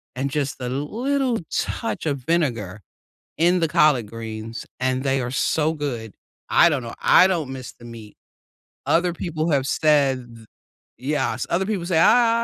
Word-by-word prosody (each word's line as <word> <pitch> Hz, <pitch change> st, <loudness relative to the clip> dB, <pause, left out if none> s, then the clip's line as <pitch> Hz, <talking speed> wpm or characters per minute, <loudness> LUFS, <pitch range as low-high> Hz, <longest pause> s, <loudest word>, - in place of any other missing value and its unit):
and 135 Hz, +2 st, -2 dB
just 140 Hz, -2 st, -2 dB
a 125 Hz, -, -4 dB
little 240 Hz, -, -1 dB
touch 230 Hz, -, -3 dB
of 145 Hz, -3 st, 0 dB
vinegar 120 Hz, -, -1 dB, 0.6 s
in 175 Hz, +3 st, +3 dB
the 165 Hz, -, +2 dB
collard 150 Hz, -8 st, +3 dB
greens, 115 Hz, 0 st, -7 dB
and 130 Hz, 0 st, 0 dB
they 135 Hz, -1 st, +1 dB
are 120 Hz, 0 st, -4 dB
so 155 Hz, +3 st, +1 dB
good. 120 Hz, -9 st, -5 dB, 0.4 s
I 170 Hz, -, +6 dB
don't 145 Hz, -6 st, -1 dB
know, 115 Hz, -, -7 dB
I 185 Hz, -, +6 dB
don't 165 Hz, -8 st, -2 dB
miss 130 Hz, -2 st, -8 dB
the 120 Hz, -, -16 dB
meat. 115 Hz, -3 st, -11 dB, 0.7 s
Other 175 Hz, +1 st, +2 dB
people 165 Hz, -1 st, -3 dB
have 140 Hz, -3 st, +1 dB
said, 135 Hz, -6 st, +1 dB
"Th 110 Hz, -1 st, -15 dB, 0.5 s
yes." 130 Hz, -3 st, -1 dB
Other 185 Hz, +3 st, +1 dB
people 200 Hz, -5 st, -2 dB
say, 175 Hz, -3 st, +1 dB
"I 230 Hz, +5 st, +4 dB
140 Hz, 165 wpm, -22 LUFS, 125-170 Hz, 0.7 s, I